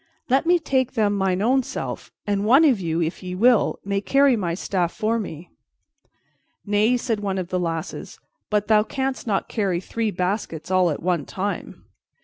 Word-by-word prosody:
Let 270 Hz, +5 st, +2 dB
me 350 Hz, +1 st, +5 dB
take 265 Hz, -6 st, 0 dB
them 210 Hz, -4 st, +1 dB
mine 190 Hz, -1 st, 0 dB
own 260 Hz, +4 st, +3 dB
self, -, -, -6 dB
and 205 Hz, -1 st, 0 dB
one 265 Hz, +9 st, +6 dB
of 260 Hz, -8 st, +4 dB
you, 165 Hz, -1 st, -1 dB
if 160 Hz, +2 st, -4 dB
ye 180 Hz, -1 st, -5 dB
will, 235 Hz, +3 st, +3 dB
may 200 Hz, 0 st, -1 dB
carry 275 Hz, +3 st, +4 dB
my 175 Hz, -6 st, -2 dB
staff 180 Hz, -2 st, -1 dB
for 225 Hz, +2 st, -1 dB
me." 175 Hz, -5 st, -7 dB, 1.1 s
"Nay," 210 Hz, +4 st, +2 dB
said 235 Hz, -3 st, -2 dB
one 195 Hz, -2 st, -2 dB
of 180 Hz, -2 st, -3 dB
the 185 Hz, -, -1 dB
lasses, 165 Hz, -2 st, -4 dB, 0.3 s
"but 210 Hz, -1 st, 0 dB
thou 215 Hz, -1 st, +5 dB
canst 265 Hz, +3 st, -3 dB
not 200 Hz, -3 st, 0 dB
carry 195 Hz, -5 st, -1 dB
three 225 Hz, +4 st, -2 dB
baskets 180 Hz, -3 st, -3 dB
all 185 Hz, -2 st, +4 dB
at 150 Hz, -, -4 dB
one 175 Hz, -5 st, 0 dB
time." 200 Hz, +2 st, -5 dB
205 Hz, 180 wpm, -23 LUFS, 180-230 Hz, 1.1 s, one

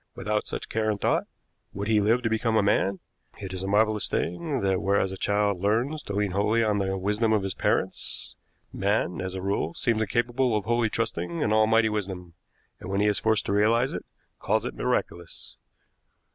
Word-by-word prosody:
Without 105 Hz, 0 st, -2 dB
such -, -, -5 dB
care 110 Hz, 0 st, -1 dB
and 105 Hz, -1 st, -1 dB
thought, -, -, +1 dB, 0.5 s
would 100 Hz, +1 st, -4 dB
he 110 Hz, -1 st, +3 dB
live 115 Hz, +5 st, +2 dB
to 115 Hz, -, +1 dB
become 110 Hz, 0 st, +1 dB
a 105 Hz, -, +3 dB
man? 100 Hz, -1 st, +2 dB, 0.4 s
It 95 Hz, -2 st, -6 dB
is 95 Hz, -, -4 dB
a 95 Hz, -, -3 dB
marvelous 105 Hz, +1 st, +2 dB
thing 135 Hz, -, -2 dB
that, 95 Hz, -1 st, +1 dB
whereas 95 Hz, -1 st, +1 dB
a -, -, -5 dB
child 100 Hz, -1 st, 0 dB
learns 120 Hz, -, 0 dB
to 100 Hz, -, -7 dB
lean 100 Hz, -1 st, 0 dB
wholly 105 Hz, +4 st, +2 dB
on 105 Hz, -2 st, +1 dB
the 95 Hz, 0 st, -1 dB
wisdom 105 Hz, +4 st, 0 dB
of 105 Hz, -3 st, +2 dB
his 95 Hz, -1 st, -2 dB
parents, -, -, -1 dB, 0.4 s
man, 100 Hz, -2 st, 0 dB
as 95 Hz, 0 st, -4 dB
a 95 Hz, -, -5 dB
rule, 95 Hz, -4 st, -1 dB
seems 115 Hz, -2 st, 0 dB
incapable 120 Hz, +1 st, +1 dB
of 105 Hz, -, -4 dB
wholly 120 Hz, 0 st, +1 dB
trusting 90 Hz, -7 st, -2 dB
an 105 Hz, -, +1 dB
Almighty 110 Hz, +1 st, +4 dB
wisdom; 95 Hz, -5 st, -4 dB, 0.5 s
and, -, -, -8 dB
when 100 Hz, +1 st, 0 dB
he 105 Hz, -, +3 dB
is 105 Hz, -1 st, +2 dB
forced 110 Hz, -1 st, +1 dB
to -, -, -1 dB
realize 115 Hz, +5 st, +3 dB
it, -, -, -4 dB, 0.4 s
calls -, -, 0 dB
it -, -, -3 dB
miraculous. 85 Hz, -1 st, -3 dB
105 Hz, 200 wpm, -26 LUFS, 95-110 Hz, 0.5 s, Almighty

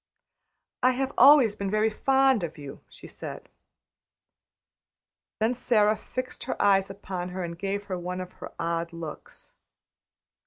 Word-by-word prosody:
"I 255 Hz, +1 st, +4 dB
have 265 Hz, +1 st, -2 dB
always 265 Hz, -4 st, +7 dB
been 200 Hz, -2 st, -4 dB
very 215 Hz, +2 st, +2 dB
fond 265 Hz, 0 st, +3 dB
of 165 Hz, -1 st, -5 dB
you," 140 Hz, -2 st, -9 dB
she -, -, -13 dB
said. -, -, -8 dB, 1.9 s
Then 220 Hz, +3 st, +2 dB
Sara 220 Hz, -4 st, +2 dB
fixed 255 Hz, +3 st, -6 dB
her -, -, -4 dB
eyes 195 Hz, -1 st, +3 dB
upon 185 Hz, -2 st, -5 dB
her 185 Hz, 0 st, -4 dB
and 170 Hz, -1 st, -5 dB
gave 200 Hz, +3 st, -3 dB
her 185 Hz, -3 st, -4 dB
one 180 Hz, +1 st, -4 dB
of 185 Hz, 0 st, -6 dB
her -, -, -8 dB
odd 170 Hz, 0 st, -2 dB
looks. 165 Hz, -2 st, -9 dB
200 Hz, 145 wpm, -27 LUFS, 180-240 Hz, 1.9 s, always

